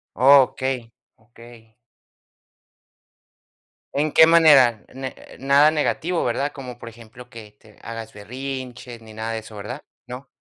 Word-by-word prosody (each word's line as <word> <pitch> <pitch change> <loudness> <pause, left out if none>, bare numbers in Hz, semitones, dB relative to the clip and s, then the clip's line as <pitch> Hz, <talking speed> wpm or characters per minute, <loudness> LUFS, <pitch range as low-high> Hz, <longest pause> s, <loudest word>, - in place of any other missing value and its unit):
Okey, 130 -2 +3 0.3
okey. 115 0 -18 2.2
¿En 145 +1 -1
qué 160 - +7
manera? 140 -9 +5
Ne 130 0 -7 0.2
nada 140 +3 +4
negativo, 165 +3 -1
¿verdad? 140 +4 -2
Como, 125 -3 -10
por 115 - -10
ejemplo, 120 +2 -15
que 110 -4 -12
te 110 -2 -21
hagas 115 -1 -8
berrinches 125 +2 -8
ni 110 -1 -14
nada 110 +1 -5
de 110 - -3
eso, 110 0 -13
¿verdad? 115 +8 -8 0.3
¿No? 125 +2 -9
125 Hz, 125 wpm, -21 LUFS, 115-135 Hz, 2.2 s, qué